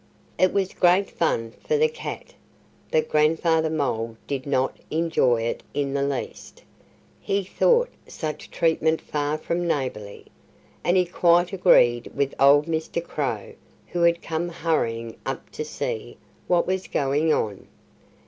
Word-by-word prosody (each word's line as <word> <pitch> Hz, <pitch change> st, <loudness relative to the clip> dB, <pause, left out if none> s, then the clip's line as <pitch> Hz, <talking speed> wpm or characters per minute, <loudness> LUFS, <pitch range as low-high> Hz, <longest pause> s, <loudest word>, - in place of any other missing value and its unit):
It 185 Hz, -, +4 dB
was 195 Hz, -2 st, 0 dB
great 185 Hz, +2 st, +3 dB
fun 115 Hz, -9 st, -1 dB
for 465 Hz, -, +2 dB
the 465 Hz, +1 st, +4 dB
cat. 480 Hz, +1 st, -7 dB, 0.6 s
But 475 Hz, -1 st, +1 dB
Grandfather 160 Hz, +1 st, +2 dB
Mole 115 Hz, -7 st, -2 dB
did 135 Hz, -1 st, -4 dB
not 135 Hz, -1 st, +1 dB
enjoy 155 Hz, -8 st, +2 dB
it 115 Hz, -, -2 dB
in 140 Hz, -1 st, -1 dB
the 140 Hz, -, 0 dB
least. 140 Hz, -2 st, -4 dB, 0.6 s
He 200 Hz, 0 st, -1 dB
thought 485 Hz, -, +2 dB, 0.2 s
such 155 Hz, -2 st, -6 dB
treatment 160 Hz, -1 st, +1 dB
far 150 Hz, 0 st, -2 dB
from 170 Hz, +2 st, -2 dB
neighborly. 125 Hz, -10 st, -3 dB, 0.6 s
And 175 Hz, +2 st, +3 dB
he 180 Hz, -, +4 dB
quite 175 Hz, +1 st, +3 dB
agreed 120 Hz, -11 st, +4 dB
with 140 Hz, -1 st, 0 dB
old 145 Hz, +2 st, +6 dB
Mr. 165 Hz, +1 st, -2 dB
Crow, 460 Hz, -, -3 dB, 0.4 s
who 175 Hz, -, -2 dB
had 170 Hz, 0 st, +3 dB
come 165 Hz, +2 st, -2 dB
hurrying 115 Hz, -9 st, -2 dB
up -, -, -5 dB
to -, -, -4 dB
see -, -, -5 dB, 0.3 s
what 175 Hz, -1 st, +3 dB
was 185 Hz, 0 st, -2 dB
going 145 Hz, +3 st, +1 dB
on. 105 Hz, -9 st, -1 dB
160 Hz, 140 wpm, -24 LUFS, 135-175 Hz, 0.6 s, old